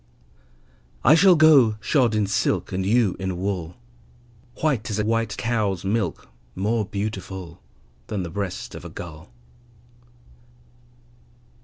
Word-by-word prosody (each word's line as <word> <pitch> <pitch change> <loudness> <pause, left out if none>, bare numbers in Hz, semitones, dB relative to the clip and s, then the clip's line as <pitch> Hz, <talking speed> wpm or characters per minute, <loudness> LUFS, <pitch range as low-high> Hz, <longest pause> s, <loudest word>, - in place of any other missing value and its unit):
I 135 - +7
shall 180 +3 +6
go 145 -9 +6
shod 120 +1 +2
in 105 -1 +2
silk, 100 0 0
And 95 +1 -2
you 105 0 +2
in 95 -2 -3
wool, 90 -1 -3 0.9
White 135 -9 +1
as 105 - -2
a 105 - 0
white 115 -2 -1
cow's 105 -6 -1
milk, 105 +2 -1 0.3
More 105 +3 0
beautiful 95 -4 -5 0.5
Than 100 -4 -3
the 85 - -6
breast 100 0 -4
of - - -9
a - - -8
gull. 80 -3 -9
105 Hz, 125 wpm, -23 LUFS, 95-115 Hz, 0.9 s, I